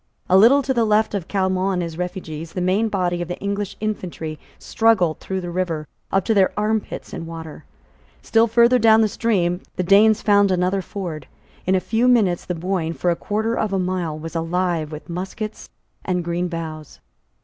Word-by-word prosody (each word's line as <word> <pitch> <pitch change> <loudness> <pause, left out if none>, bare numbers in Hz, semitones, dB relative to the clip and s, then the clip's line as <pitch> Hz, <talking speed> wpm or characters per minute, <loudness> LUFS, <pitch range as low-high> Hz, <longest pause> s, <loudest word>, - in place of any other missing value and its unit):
A 185 - +3
little 245 +9 +6
to 265 - 0
the 235 -2 +2
left 215 0 +2
of 195 -5 -3
Caillemot 190 -1 0
and 180 - -1
his 165 -1 -5
refugees, 165 -3 -5
the - - -3
main 190 +5 +1
body 180 -3 -1
of 175 - -3
the 175 - -5
English 200 0 -3
infantry 175 -7 -4 0.2
struggled 215 -8 +2
through 190 -1 -4
the 175 -1 -5
river, 170 -4 -2 0.2
up 195 -1 +1
to 225 - +2
their 195 -3 +4
armpits 215 0 -2
in 165 - -6
water. 165 -2 -9 0.6
Still 225 +1 +3
further 235 +2 +4
down 220 -1 +6
the 220 - +4
stream 190 -5 0
the 185 - -1
Danes 210 +4 +5
found 205 -1 +4
another 185 +1 +1
ford. 175 -7 -6 0.4
In 190 - +3
a - - +3
few 225 +6 +1
minutes 210 -8 +3
the 180 - -3
Boyne, 170 -1 -2
for 175 +1 0
a - - +1
quarter 220 +5 -2
of 215 -3 -1
a - - +2
mile, 180 -4 -2
was 165 +2 -8
alive 165 -1 -1
with 155 0 -8
muskets 190 +5 -6 0.3
and 180 -1 -1
green 175 +1 -1
boughs. 160 - -7
185 Hz, 195 wpm, -21 LUFS, 170-210 Hz, 0.6 s, little